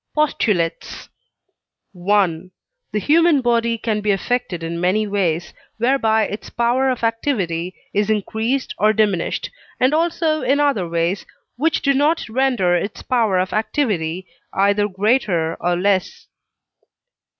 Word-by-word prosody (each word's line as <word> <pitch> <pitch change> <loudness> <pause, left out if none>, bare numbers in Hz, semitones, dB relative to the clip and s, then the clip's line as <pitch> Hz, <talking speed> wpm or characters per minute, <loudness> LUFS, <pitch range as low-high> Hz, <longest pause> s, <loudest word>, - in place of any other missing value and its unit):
POSTULATES 210 - -1 1.0
I. 185 -4 +2 0.4
The - - -2
human 315 - +4
body 235 -1 +1
can 215 -2 -2
be 210 - -2
affected 200 -3 -1
in 170 +1 -4
many 195 +4 +2
ways, 180 -5 -1 0.2
whereby 225 -2 +2
its 205 0 -5
power 245 +3 +1
of 250 -2 -2
activity 195 - -1 0.2
is 205 +1 +1
increased 220 +5 -1
or 215 +1 +4
diminished, 205 -5 0 0.3
and 255 +3 +3
also 320 -1 +1
in 275 +3 +1
other 275 -12 +1
ways 170 +3 -1 0.3
which 315 +6 0
do 280 - +3
not 295 +3 +1
render 240 -7 +1
its 190 +4 -3
power 225 -7 +1
of 185 +1 -1
activity 195 - -1 0.3
either 200 +1 +2
greater 195 -5 0
or 175 0 0
less. 190 +1 0
215 Hz, 130 wpm, -20 LUFS, 185-255 Hz, 1.0 s, human